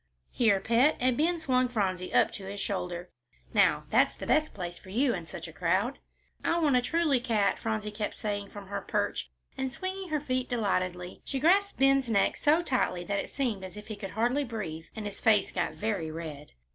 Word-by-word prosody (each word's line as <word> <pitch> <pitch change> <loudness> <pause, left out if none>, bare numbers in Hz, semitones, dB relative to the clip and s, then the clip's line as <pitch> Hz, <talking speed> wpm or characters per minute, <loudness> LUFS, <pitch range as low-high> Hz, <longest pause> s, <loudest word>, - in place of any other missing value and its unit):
"Here, 220 -5 +3
pet," 235 +9 +3
and 255 0 +2
Ben 335 +5 +1
swung 255 -5 +2
Phronsie 190 -6 -1
up - - +4
to 195 - -8
his 200 +1 -6
shoulder. 180 -3 -3 0.4
"Now, - - +4
that's - - +4
the - - -7
best 310 0 +2
place 175 -3 -5
for 190 - -14
you 245 +5 +2
in 170 -5 -5
such 155 - -7
a 165 - -11
crowd." 185 - 0 0.4
"I 335 - +2
want 300 -6 +3
a 250 - +5
truly 305 0 +2
cat," 220 -5 +1
Phronsie 215 -1 -2
kept 210 0 -3
saying 205 -1 -3
from 205 -1 -9
her 200 0 -3
perch, - - -1 0.3
and, 265 -1 -2
swinging 375 +4 -4
her 305 -1 +1
feet 255 -3 -1
delightedly, 185 -6 -1
she 270 - -3
grasped 390 +7 +3
Ben's 270 -2 +4
neck 200 -3 +3
so 315 +4 +3
tightly 245 - 0
it 200 +2 -2
seemed 235 -8 -1
as 185 +1 -8
if 210 +1 -10
he 215 - -4
could 200 -1 -6
hardly 245 +6 +2
breathe; 195 - -5
and 215 - -5
his 205 -1 -6
face 215 -4 +4
got - - -1
very 205 -7 -2
red. 155 -2 -7
220 Hz, 205 wpm, -29 LUFS, 190-265 Hz, 0.4 s, a